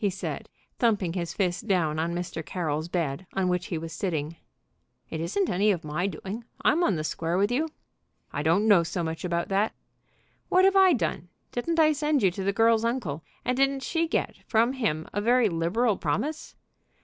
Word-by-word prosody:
he 205 - +3
said, 190 - -5 0.3
thumping 205 -8 +2
his 170 -2 -3
fist 185 +2 -1
down 165 -6 +1
on 165 +1 0
Mr. 175 -2 -4
Carroll's 155 -1 -2
bed, 170 -2 -2
on 190 -1 0
which 180 0 0
he 170 - -2
was 165 0 -6
sitting. 165 -4 -2 0.8
"It 160 - -3
isn't 205 - 0
any 200 +4 +2
of 180 -5 +1
my 155 +5 -1
doing. 200 +3 -6 0.2
I'm 340 +3 +4
on 200 - +2
the 155 - -2
square 165 +2 -1
with 200 +4 +2
you." 305 +6 0 0.6
"I - - -1
don't 170 +8 +2
know 200 -5 +7
so 170 +1 -3
much 160 0 -4
about 170 -1 -1
that." 200 +3 +1 0.7
"What 370 +1 +5
have 390 0 +4
I 380 -2 +7
done? 175 - -2 0.2
Didn't 330 +7 -1
I 310 -1 +6
send 295 -2 +1
her 190 - +4
to 190 +2 -5
the 200 - +2
girl's 225 +2 +3
uncle, 215 - -2 0.2
and 250 - +1
didn't 270 0 +1
she 330 -1 0
get 325 - -1
from 230 +3 +3
him 160 - -1
a 205 - 0
very 240 0 +4
liberal 190 +6 +1
promise?" 275 - -2
195 Hz, 195 wpm, -27 LUFS, 165-245 Hz, 0.8 s, know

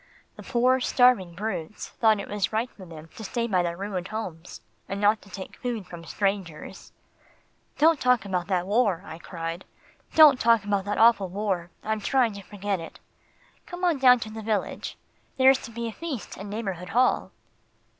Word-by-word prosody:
The - - -11
poor 255 +1 +2
starving 245 -9 +3
brutes 195 -2 -5
thought 220 -2 +2
it - - -6
was 205 -2 -1
right 225 +3 -1
for 190 -3 -13
them 160 -1 -11
to 220 - -8
stay 235 +3 -2
by 190 -6 +1
their 170 -1 -3
ruined 195 -2 -4
homes, 185 -6 -7 0.3
and 195 - -3
not 210 +1 +3
to 200 - -17
take 190 -1 -9
food 235 -5 -4
from 170 -1 -10
strangers." 195 -6 -3 0.9
"Don't 320 -1 +4
talk 250 -3 +2
about 180 -3 -2
that 180 -3 0
war," 205 -3 +1
I 160 - -9
cried, 165 0 -6 0.5
"don't 300 -5 +8
talk 230 -2 +4
about 200 -1 -1
that 205 0 -2
awful 225 -4 +5
war 190 -3 -2
I'm 220 0 -1
trying 245 0 +2
to 200 - -8
forget 200 -1 -3
it. 165 - -10 0.7
Come 355 +1 -8
on 340 -6 +2
down 250 -2 +7
to 215 - -5
the 220 0 -7
village. 215 -1 -3 0.4
There's 265 0 +5
to 230 - -10
be 235 +1 -4
a - - -4
feast 300 -7 -6
in 200 +2 -8
Neighbourhood 195 -4 -4
Hall." 240 -3 +2
205 Hz, 185 wpm, -26 LUFS, 185-235 Hz, 0.9 s, don't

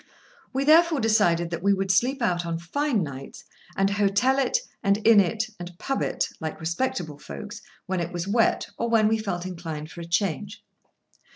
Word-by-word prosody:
We 270 +1 -1
therefore 320 +1 +5
decided 175 -7 +2
that 170 -1 -3
we 200 +1 +3
would 190 0 0
sleep 250 +7 +1
out 175 -4 +1
on 170 -1 -3
fine 225 - -1
nights; 135 -2 -8 0.3
and 195 - +3
hotel 205 +6 +2
it, 275 - +2 0.2
and 200 -2 +2
inn 225 -2 +8
it, 215 +3 +1
and 175 0 -8
pub. 270 +7 -2
it, - - 0
like 160 -1 -5
respectable 165 - -2
folks, 70 - -8 0.2
when 185 -1 -2
it 170 0 -3
was 175 +1 -4
wet, 225 +3 +2
or 235 - 0
when 225 -2 +4
we 220 +1 +1
felt 180 -5 -3
inclined 165 -4 -6
for 170 - -9
a - - -6
change. 195 +4 -2
195 Hz, 185 wpm, -25 LUFS, 170-225 Hz, 0.3 s, inn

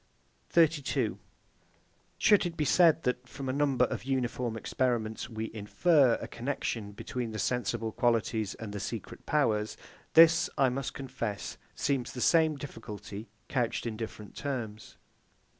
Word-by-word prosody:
32. 160 -5 +2 1.0
Should 205 -4 +5
it 170 - -8
be 150 - +1
said 165 +1 +5
that, 125 0 -1
from 135 0 -6
a 130 - 0
number 140 -3 +3
of - - -4
uniform 125 -3 -1
experiments, 115 -2 -1
we 110 -1 -4
infer 125 +5 +3
a - - -6
connexion 115 -4 -3
between 120 +3 -4
the - - -4
sensible 115 0 -1
qualities 110 -3 +1
and 110 -2 -7
the 100 - -4
secret 110 +1 -6
powers; 110 -8 +1 0.4
this, 165 +1 +7
I 135 - +4
must 130 +1 -3
confess, 115 -6 -4 0.2
seems 135 -4 -1
the 125 - -6
same 160 0 +4
difficulty, 105 -6 -8 0.2
couched 120 -2 -1
in 115 -2 -3
different 110 -2 -7
terms. 115 -7 -5
125 Hz, 140 wpm, -30 LUFS, 110-140 Hz, 1.0 s, this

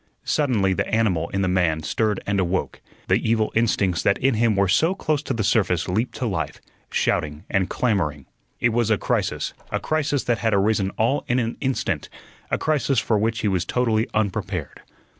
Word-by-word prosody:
Suddenly 115 -10 +2
the - - -1
animal 95 -7 +1
in 95 0 -1
the - - +1
man 85 -4 +1
stirred 105 +3 0
and 100 -1 +1
woke; 95 - -2 0.3
the - - +4
evil 110 -1 +1
instincts 100 -6 +1
that 100 - +2
in 135 +1 +2
him 115 -1 +2
were 100 0 +3
so 165 - +3
close 155 -6 0
to - - -5
the 110 - -1
surface 90 -6 +1
leaped 110 +7 -1
to 130 - -3
life, 80 -10 -3 0.3
shouting 75 -1 -1
and 95 -2 +1
clamoring. 75 - 0 0.3
It 120 - +3
was 115 -1 +1
a 110 - +3
crisis - - -1 0.2
a - - -1
crisis 145 -3 0
that 120 -1 0
had 110 -3 +1
arisen 100 -1 +2
all 120 +6 +1
in 125 - +1
an 115 -1 -1
instant; 125 - -1 0.4
a - - +1
crisis 145 -3 0
for 110 -1 +2
which 110 +1 0
he 110 - 0
was 95 -3 +1
totally 115 -3 +1
unprepared. 105 -3 -2
110 Hz, 190 wpm, -23 LUFS, 95-120 Hz, 0.4 s, the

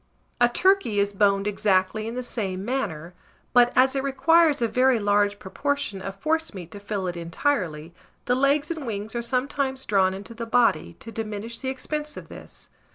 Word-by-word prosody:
A 240 0 +5
turkey 375 - +2
is 200 0 +1
boned 200 0 +2
exactly 205 +1 +1
in 230 - -5
the 250 - -3
same 195 -6 -4
manner; 180 - -3 0.4
but 245 -1 +6
as 260 +2 +4
it 270 - +1
requires 305 +3 +3
a 235 - +2
very 255 +1 +3
large 205 0 +2
proportion 210 0 -3
of 195 +1 -6
forcemeat 310 - -2
to 205 - -8
fill 200 -1 -3
it 175 -1 -3
entirely, 170 - -2 0.3
the 245 - +2
logs 280 +4 +2
and 310 -6 -5
wings 210 0 -4
are 235 - -2
sometimes 265 +2 -1
drawn 190 -3 +2
into 200 +4 -9
the 230 0 -6
body, 230 - +2
to 230 - -8
diminish 225 +1 -5
the 260 - -3
expense 300 +3 -4
of - - -9
this. - - -12
230 Hz, 180 wpm, -25 LUFS, 200-265 Hz, 0.4 s, but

